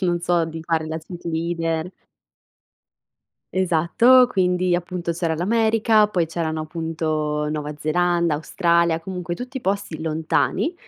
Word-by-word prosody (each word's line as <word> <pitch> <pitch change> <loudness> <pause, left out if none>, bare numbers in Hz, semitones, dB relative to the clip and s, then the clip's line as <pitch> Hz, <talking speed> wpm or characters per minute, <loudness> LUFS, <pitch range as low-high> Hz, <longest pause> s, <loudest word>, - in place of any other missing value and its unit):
non 175 -2 +1
so, 170 -1 +1
di 160 0 -6
fare 160 -1 -1
la 160 0 -4
cheerleader. 165 0 -3 1.6
Esatto. 190 +8 +4
Quindi, 180 -3 +1
appunto 175 0 -4
c'era 165 -1 -1
l'America, 220 +4 +3
poi 180 -5 0
c'erano 160 -1 -3
appunto 155 -2 -2
Nuova 150 -1 -4
Zelanda, 170 +1 +1
Australia, 170 +1 +1
comunque 180 -1 -5
tutti 255 +5 -6
posti 195 -6 -2
lontani, 160 - 0
170 Hz, 115 wpm, -22 LUFS, 160-180 Hz, 1.6 s, Esatto